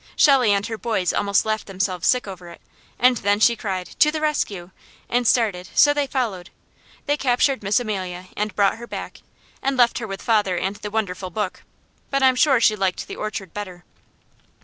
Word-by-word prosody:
Shelley 265 -7 +5
and 200 0 +1
her 225 -1 -5
boys 210 -7 -1
almost 200 0 +1
laughed 215 0 -2
themselves 185 -2 -2
sick 250 -4 +2
over 180 -3 -9
it, 170 - -13 0.4
and 250 0 +4
then 205 0 +1
she 235 +2 +4
cried, 190 -5 -4
"To 300 - +6
the 310 0 -2
rescue!" 205 - -2 0.4
and 245 0 0
started, 200 -7 +1
so 290 - +6
they 290 -1 -1
followed. 220 -10 -3 0.6
They 290 0 +1
captured 265 0 +1
Miss 205 +5 +2
Amelia 185 -6 -4
and 210 0 -3
brought 200 0 +2
her 235 +1 -9
back, - - -7 0.4
and 270 0 -1
left 240 0 +3
her 225 - -5
with 195 -1 -7
father 210 -5 +1
and 195 +3 -2
the 210 - -6
wonderful 195 -4 -3
book, 200 0 -4 0.5
but 275 -1 0
I'm 260 -1 +5
sure 270 -1 +4
she 215 -2 +4
liked 190 -3 -2
the - - -7
orchard 210 -5 -5
better. 185 -4 -7
215 Hz, 195 wpm, -22 LUFS, 190-245 Hz, 0.6 s, To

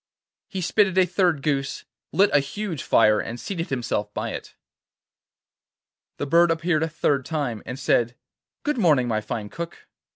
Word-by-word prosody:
He 190 -2 -4
spitted 190 +1 +2
a 185 - +6
third 175 -5 +1
goose, 140 -3 -1 0.3
lit 200 +2 +4
a 145 - +6
huge 165 +2 -4
fire, 110 -1 +4
and 120 +1 -5
seated 175 +1 -4
himself 125 -5 -2
by - - -2
it. - - -8 1.6
The - - -2
bird 170 +4 +5
appeared 165 -1 +1
a 160 - 0
third 145 -4 +1
time, 140 -7 -2
and 130 - -5
said: 120 -2 +1 0.5
'Good 295 -4 0
morning, 150 - +4
my 110 -2 0
fine 105 0 -4
Cook. 170 +5 -7
155 Hz, 160 wpm, -24 LUFS, 125-175 Hz, 1.6 s, a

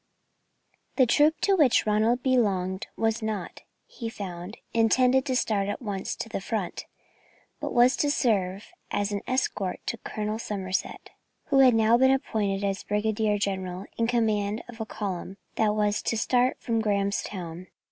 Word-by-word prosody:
The 260 - +5
troop 295 +6 +3
to 395 - +3
which 290 -9 +4
Ronald 220 +4 +2
belonged 195 -8 +1
was 225 0 0
not, 215 -4 -4 0.2
he 230 -2 -6
found, 185 -2 -7 0.2
intended 250 +3 +3
to 260 - 0
start 205 -5 +1
at 205 - -3
once 200 -5 -4
to - - -5
the 215 - -4
front, 195 -3 -4 0.7
but - - -4
was 245 +2 +5
to 290 - +1
serve 200 -8 0 0.2
as 205 0 -1
an 200 -1 -2
escort 210 -7 -1
to 235 - -2
Colonel 215 +1 -4
Somerset, 190 -4 -4 0.4
who 275 -2 +4
had 255 -3 +7
now 225 +1 +4
been 265 0 +5
appointed 210 -7 0
as 195 -1 -1
Brigadier 210 0 0
General 190 -2 -3
in 230 - 0
command 215 -3 0
of 235 -2 -9
a 220 - -4
column 195 -2 -5 0.2
that 210 -1 +1
was 210 0 +1
to 225 - -1
start 250 +3 +2
from 230 -1 -1
Grahamstown. 195 -4 -2
215 Hz, 155 wpm, -27 LUFS, 200-240 Hz, 0.7 s, had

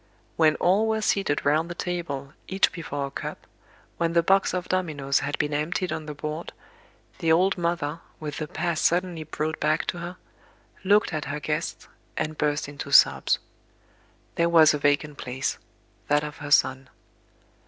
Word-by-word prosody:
When 155 -2 +4
all 200 +5 +3
were 220 0 0
seated 195 -9 0
round 155 +4 +2
the 175 - -5
table, 150 -7 -4
each 190 +1 +2
before 145 -4 -4
a 140 - -7
cup, - - -6 0.5
when 170 -1 +1
the 170 0 +4
box 195 +3 +3
of 180 -1 -3
dominoes 150 -7 0
had 145 +3 -3
been 150 - -1
emptied 165 +5 -1
on 155 -1 -5
the 150 - -6
board, 155 +3 -5 0.7
the 165 -2 +2
old 185 +4 +4
mother, 170 -3 -2 0.2
with 150 -2 -5
the 155 - -3
past 165 +1 -2
suddenly 175 -2 +1
brought 155 +1 -3
back 155 +1 +1
to 175 - -3
her, 175 +2 -6 0.7
looked 200 -1 +3
at 155 -1 -2
her 145 +1 -3
guests, 150 +3 -3 0.3
and 155 0 -2
burst 150 -1 0
into 145 0 -7
sobs. - - +5 1.0
There 170 0 +2
was 160 -2 +7
a 150 - -1
vacant 145 0 +1
place, 130 +2 -3 0.5
that 145 0 +3
of 150 0 -6
her 145 - -7
son. 130 -2 +3
155 Hz, 170 wpm, -26 LUFS, 145-175 Hz, 1.0 s, was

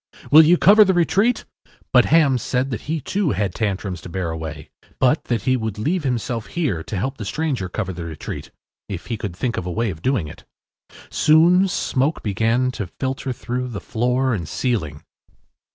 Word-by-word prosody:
“Will 155 +2 +10
you 165 +3 +5
cover 210 +4 +7
the 190 -2 +1
retreat?” 200 +7 +2 0.5
But - - +6
Ham 145 -6 +4
said 125 +3 -1
that 125 - -6
he 160 0 0
too 190 - 0
had 100 -3 -1
Tantrums 95 -5 -3
to - - -9
bear 85 -1 -3
away, 80 -1 -7 0.3
but 130 +4 +2
that 115 -5 -1
he 130 - +2
would 110 -4 -3
leave 155 - -1
himself 120 -2 -2
here 140 - -1
to 100 - -5
help 130 +7 -3
the - - -4
stranger 130 -4 -2
cover 95 +1 -3
the 85 -1 -6
retreat, 80 -3 -7 0.4
if 95 -4 -5
he 115 - -3
could 105 -5 -5
think 115 +5 -2
of 90 - -3
a - - -2
way 110 +3 -1
of 80 -2 -10
doing 125 - 0
it. 75 - -12 0.7
Soon 170 +5 +5
smoke 145 -4 -1
began 115 +5 +1
to 105 -6 -5
filter 130 +6 -4
through 125 +2 -3
the 115 -5 -5
floor 125 +3 0
and 85 -8 -4
ceiling. 80 - -2
120 Hz, 190 wpm, -21 LUFS, 95-140 Hz, 0.7 s, Will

